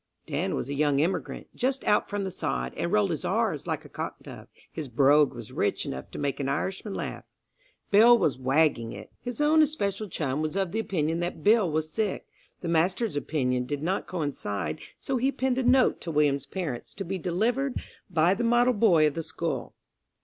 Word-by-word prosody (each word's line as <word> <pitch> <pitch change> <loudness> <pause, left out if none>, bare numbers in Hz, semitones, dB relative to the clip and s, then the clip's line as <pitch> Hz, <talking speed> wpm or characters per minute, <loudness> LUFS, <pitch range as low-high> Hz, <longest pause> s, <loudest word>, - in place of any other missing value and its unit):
Dan - - -1
was - - -3
a 140 - -3
young 145 -1 +2
immigrant, 175 +5 -1
just 265 +2 -1
out 210 - +2
from 205 -1 -2
the 190 - -3
sod, 60 - -2
and 170 - -2
rolled 205 -3 +3
his 160 - -3
"r's" - - 0
like - - -3
a - - -9
cock - - -5
dove. - - -10 0.2
His 155 -5 -6
brogue 140 +4 +5
was 120 -2 -8
rich - - 0
enough 65 0 -6
to - - -9
make 140 -1 -2
an 135 -1 -1
Irishman 190 +7 -3
laugh. - - -5 0.7
Bill 230 +4 +8
was 155 - +1
"wagging 130 -3 +2
it." - - -10
His 245 0 -6
own 305 +1 +5
especial 215 -9 0
chum 145 -3 -2
was 155 +2 -2
of 195 -3 0
the 220 - -1
opinion 170 -6 -1
that 175 -3 -4
Bill 210 -3 +4
was 155 0 -1
sick. 215 -3 -1 0.4
The 175 - -4
master's 180 +5 +1
opinion 125 -4 -1
did 145 +2 -3
not 185 +4 -1
coincide, 105 - -3 0.2
so 270 - -2
he 265 +3 +2
penned 260 -1 0
a - - 0
note 255 +1 +4
to 170 - -5
William's 145 -3 +1
parents, 165 -11 -5
to 195 - -4
be 190 +2 -3
delivered 235 - 0 0.3
by 170 0 +3
the 235 - -2
model 240 +2 +4
boy 195 -8 +4
of 150 - +2
the 165 - -3
school. - - -4
170 Hz, 200 wpm, -27 LUFS, 145-215 Hz, 0.7 s, Bill